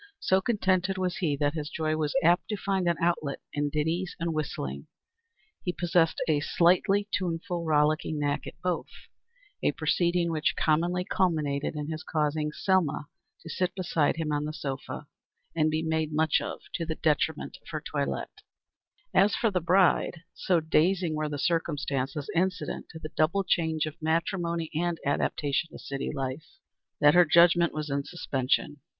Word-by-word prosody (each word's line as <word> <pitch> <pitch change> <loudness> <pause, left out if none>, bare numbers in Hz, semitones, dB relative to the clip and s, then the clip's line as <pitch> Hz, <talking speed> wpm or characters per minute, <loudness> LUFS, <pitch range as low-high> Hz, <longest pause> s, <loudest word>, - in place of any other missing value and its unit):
So 190 0 +2
contented 190 -3 +1
was 185 -1 -1
he 150 -6 0
that 145 0 +1
his 155 -2 -4
joy 155 -1 -1
was 155 -1 -1
apt 175 +1 +4
to 210 - -1
find 195 -2 -1
an 170 - +1
outlet 165 -5 0
in 145 0 0
ditties 160 +5 -1
and 170 -1 -1
whistling 70 - -4 0.8
he 180 - -2
possessed 170 -2 +2
a 155 -2 +3
slightly 185 +6 +3
tuneful, 170 -1 -2
rollicking 155 0 +2
knack 145 -1 -1
at 160 - -10
both 180 -2 -1 0.7
a - - +2
proceeding 175 -1 +1
which 155 -2 0
commonly 175 +3 +1
culminated 155 -7 0
in 150 +1 -4
his 155 0 -4
causing 150 -1 -1
Selma 155 -5 0 0.3
to 165 - -10
sit 180 -1 -1
beside 170 -5 +1
him 160 -2 -2
on 145 0 0
the 155 - -4
sofa 135 -3 -5 0.5
and 155 -1 +3
be 155 +1 -1
made 160 -1 0
much 155 0 +2
of, - - -5
to 170 - -2
the 160 -1 -3
detriment 155 -2 0
of - - -22
her - - -3
toilette. - - -4 0.7
As 200 +2 +4
for 225 - +1
the 180 -2 0
bride, 175 -1 +3
so 180 -3 +1
dazing 165 +2 +2
were 155 0 -1
the 145 - -3
circumstances 145 -4 -1
incident 180 +1 -1
to 160 - -9
the 155 -1 -7
double 170 +6 +2
change 160 -4 +1
of 155 +1 -8
matrimony 170 +1 -1
and 170 +1 -1
adaptation 145 +2 0
to - - -9
city 135 -1 -4
life, 135 +2 -4 0.5
that 145 0 +6
her 180 - +7
judgment 170 +1 +5
was 155 -1 -4
in 140 0 0
suspension. 145 -2 -1
160 Hz, 165 wpm, -28 LUFS, 150-175 Hz, 0.8 s, her